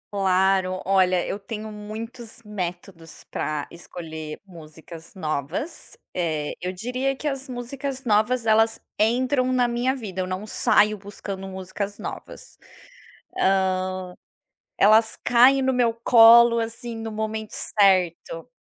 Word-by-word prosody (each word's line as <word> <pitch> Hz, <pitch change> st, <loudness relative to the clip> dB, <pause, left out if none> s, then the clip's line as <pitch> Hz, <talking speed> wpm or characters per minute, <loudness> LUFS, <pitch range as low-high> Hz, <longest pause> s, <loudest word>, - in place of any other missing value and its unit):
Claro, 190 Hz, -1 st, +2 dB
olha, 185 Hz, -2 st, +2 dB
eu 200 Hz, -, -4 dB
tenho 215 Hz, +1 st, -7 dB
muitos 220 Hz, +3 st, -8 dB
métodos 180 Hz, -4 st, -7 dB
para 150 Hz, -1 st, -3 dB
escolher 160 Hz, -3 st, -8 dB
músicas 165 Hz, -1 st, -13 dB
novas. 155 Hz, -, -4 dB, 0.2 s
Eh, 155 Hz, -4 st, -2 dB
eu 180 Hz, -, -3 dB
diria 250 Hz, +8 st, -2 dB
que 300 Hz, -, -5 dB
as 270 Hz, -2 st, -4 dB
músicas 265 Hz, +2 st, -5 dB
novas, 225 Hz, +2 st, +2 dB
elas 225 Hz, 0 st, +3 dB, 0.2 s
entram 255 Hz, +3 st, +2 dB
na 250 Hz, -1 st, +2 dB
minha 245 Hz, +2 st, 0 dB
vida, 200 Hz, -7 st, -5 dB
eu 185 Hz, -, -3 dB
não 185 Hz, +3 st, -4 dB
saio 210 Hz, -1 st, +2 dB
buscando 195 Hz, -1 st, -7 dB
músicas 190 Hz, +2 st, -5 dB
novas. -, -, -9 dB, 0.8 s
Hã, 190 Hz, -1 st, +2 dB, 0.9 s
elas 220 Hz, +2 st, +4 dB
caem 250 Hz, +3 st, +5 dB
no 265 Hz, 0 st, +2 dB
meu 245 Hz, -3 st, +2 dB
colo, 235 Hz, 0 st, +7 dB
assim, 230 Hz, +1 st, -4 dB
no 225 Hz, 0 st, -5 dB
momento 220 Hz, 0 st, -4 dB
certo. 185 Hz, -1 st, +1 dB
210 Hz, 120 wpm, -24 LUFS, 185-235 Hz, 0.9 s, colo